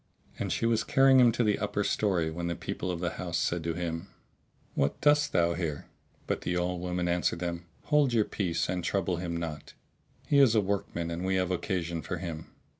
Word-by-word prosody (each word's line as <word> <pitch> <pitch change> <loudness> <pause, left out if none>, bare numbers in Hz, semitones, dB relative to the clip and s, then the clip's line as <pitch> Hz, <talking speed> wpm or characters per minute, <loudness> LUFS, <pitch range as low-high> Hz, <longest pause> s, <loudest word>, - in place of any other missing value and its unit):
And - - -2
she - - 0
was 115 -1 +2
carrying 135 0 +5
him 120 -2 +7
to 120 - +1
the 105 -2 +2
upper 105 0 -1
story 90 -7 +1
when 85 +1 -4
the 85 - -2
people 90 - -4
of 90 -1 -3
the 85 -2 -1
house - - -2
said 85 -1 0
to 85 -1 -1
him, 85 +1 -3 0.7
"What 70 - 0
dost 150 0 +4
thou 85 0 +2
here?" 80 -4 -3 0.4
But - - -2
the 90 - -1
old 90 0 -1
woman 90 0 -1
answered 85 0 +1
them, 85 0 -4 0.2
"Hold 150 -3 +3
your 110 -3 +3
peace 90 -5 -1
and 90 -1 -2
trouble 90 -1 0
him 85 -1 -3
not: 80 -3 -6 0.5
he 140 - +3
is 130 -5 +6
a - - +6
workman 95 -4 -2
and 85 +2 -3
we 95 0 +1
have 95 -1 0
occasion 85 -2 -2
for 90 - -4
him." 85 -3 -6
90 Hz, 210 wpm, -29 LUFS, 85-105 Hz, 0.7 s, him